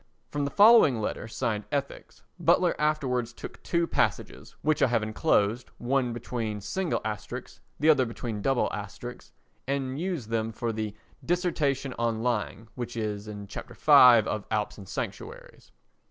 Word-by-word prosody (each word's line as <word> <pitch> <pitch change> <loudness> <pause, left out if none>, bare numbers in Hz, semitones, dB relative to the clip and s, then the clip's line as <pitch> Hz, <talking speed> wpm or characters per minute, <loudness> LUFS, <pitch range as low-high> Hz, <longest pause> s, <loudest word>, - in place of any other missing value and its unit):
From 145 -1 -1
the - - -1
following 205 - +6
letter 110 +1 -3
signed 110 -1 -2
"Ethics" 140 -1 -4 0.2
Butler - - +3
afterwards 130 -6 0
took - - -10
two 170 -1 0
passages - - -2
(which 155 0 +1
I - - +6
have 115 -3 +1
enclosed, 110 0 +1
one 125 0 0
between 115 -2 -4
single 180 - -2
asterisks 105 -3 -6 0.2
the 150 - +1
other 130 -5 +5
between 115 -2 -5
double 135 +2 +2
asterisks), 105 +4 -7 0.4
and 135 0 -2
used 170 - -3
them 115 0 -1
for 115 +1 -2
the 110 -1 -4 0.3
"Dissertation 155 -7 0
on 115 -1 0
Lying" 115 -2 -2
which 120 -1 -6
is 105 -1 -3
in 105 -1 -7
Chapter - - -9
V 120 -4 +7
of 105 -1 -3
Alps 105 -1 -2
and 95 - -11
Sanctuaries. - - -7
120 Hz, 155 wpm, -27 LUFS, 110-140 Hz, 0.4 s, V